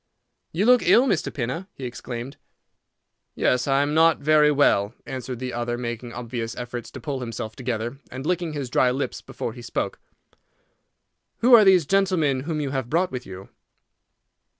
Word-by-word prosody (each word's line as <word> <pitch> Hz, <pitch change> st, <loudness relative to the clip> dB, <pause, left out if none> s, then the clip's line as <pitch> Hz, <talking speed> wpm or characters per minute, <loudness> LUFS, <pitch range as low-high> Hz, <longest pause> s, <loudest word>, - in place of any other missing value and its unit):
"You 185 Hz, +6 st, 0 dB
look 250 Hz, 0 st, +6 dB
ill, 250 Hz, -, +5 dB
Mr. 195 Hz, -, 0 dB
Pinner!" 145 Hz, +8 st, -4 dB
he 135 Hz, -, -10 dB
exclaimed. 120 Hz, +1 st, -6 dB, 1.0 s
"Yes, 125 Hz, +1 st, +1 dB
I 135 Hz, 0 st, +3 dB
am 145 Hz, +1 st, -1 dB
not 165 Hz, +1 st, +5 dB
very 150 Hz, 0 st, +4 dB
well," 120 Hz, -7 st, +2 dB
answered 130 Hz, -1 st, -5 dB
the 125 Hz, +1 st, -5 dB
other, 120 Hz, 0 st, -2 dB
making 120 Hz, 0 st, -5 dB
obvious 115 Hz, -1 st, -5 dB
efforts 120 Hz, -1 st, -6 dB
to -, -, -9 dB
pull 135 Hz, +2 st, -4 dB
himself 110 Hz, -3 st, -5 dB
together, 120 Hz, 0 st, -4 dB
and 130 Hz, +2 st, -7 dB
licking 175 Hz, -2 st, -1 dB
his 140 Hz, -4 st, -5 dB
dry 130 Hz, -, +3 dB
lips 130 Hz, +3 st, -3 dB
before -, -, -6 dB
he -, -, -10 dB
spoke. -, -, -3 dB, 1.4 s
"Who 245 Hz, +2 st, +5 dB
are 225 Hz, -3 st, +10 dB
these 185 Hz, -5 st, +5 dB
gentlemen 180 Hz, -7 st, +2 dB
whom 155 Hz, -2 st, -1 dB
you 140 Hz, -3 st, -2 dB
have 130 Hz, -3 st, -3 dB
brought 175 Hz, +5 st, +1 dB
with 125 Hz, -1 st, -6 dB
you?" 95 Hz, 0 st, -10 dB
130 Hz, 170 wpm, -24 LUFS, 120-160 Hz, 1.4 s, are